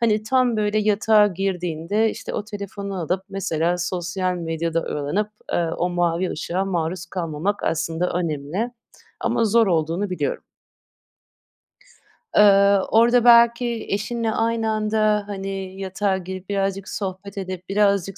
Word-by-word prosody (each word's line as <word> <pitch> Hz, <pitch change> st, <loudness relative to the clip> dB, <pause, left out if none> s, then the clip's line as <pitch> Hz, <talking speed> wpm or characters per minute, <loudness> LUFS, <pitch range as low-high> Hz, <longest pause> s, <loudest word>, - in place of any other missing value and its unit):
hani, 215 Hz, -2 st, +2 dB
tam 250 Hz, 0 st, +2 dB
böyle 210 Hz, 0 st, +1 dB
yatağa 210 Hz, 0 st, +4 dB
girdiğinde 190 Hz, +2 st, -1 dB
işte, -, -, -7 dB
o 205 Hz, -, -2 dB
telefonu 200 Hz, -1 st, -6 dB
alıp 180 Hz, +3 st, -1 dB
mesela 180 Hz, -3 st, -1 dB
sosyal 180 Hz, +1 st, -2 dB
medyada 165 Hz, -1 st, -2 dB
oyalanıp, 150 Hz, +9 st, -2 dB, 0.2 s
ııı, 165 Hz, -1 st, 0 dB
o 180 Hz, -, 0 dB
mavi 175 Hz, 0 st, 0 dB
ışığa 175 Hz, +4 st, -2 dB
maruz 175 Hz, -2 st, -2 dB
kalmamak 175 Hz, +3 st, -3 dB
aslında 165 Hz, +2 st, -1 dB
önemli 170 Hz, -, -2 dB, 0.5 s
ama 230 Hz, -, +1 dB
zor 225 Hz, +1 st, +4 dB
olduğunu 170 Hz, +3 st, 0 dB
biliyorum. 475 Hz, -, -2 dB, 1.9 s
Iıı, 200 Hz, -1 st, +6 dB
orada 235 Hz, +2 st, +5 dB
belki 235 Hz, 0 st, +5 dB
eşinle 225 Hz, +3 st, -1 dB
aynı 225 Hz, 0 st, 0 dB
anda, 215 Hz, -1 st, +1 dB
hani, 195 Hz, -1 st, -5 dB
yatağa 190 Hz, 0 st, -1 dB
girip, 185 Hz, +1 st, -8 dB
birazcık 195 Hz, -1 st, -1 dB
sohbet 200 Hz, 0 st, -5 dB
edip, 185 Hz, -1 st, -6 dB
birazcık 200 Hz, -1 st, +1 dB
195 Hz, 125 wpm, -22 LUFS, 175-210 Hz, 1.9 s, Iıı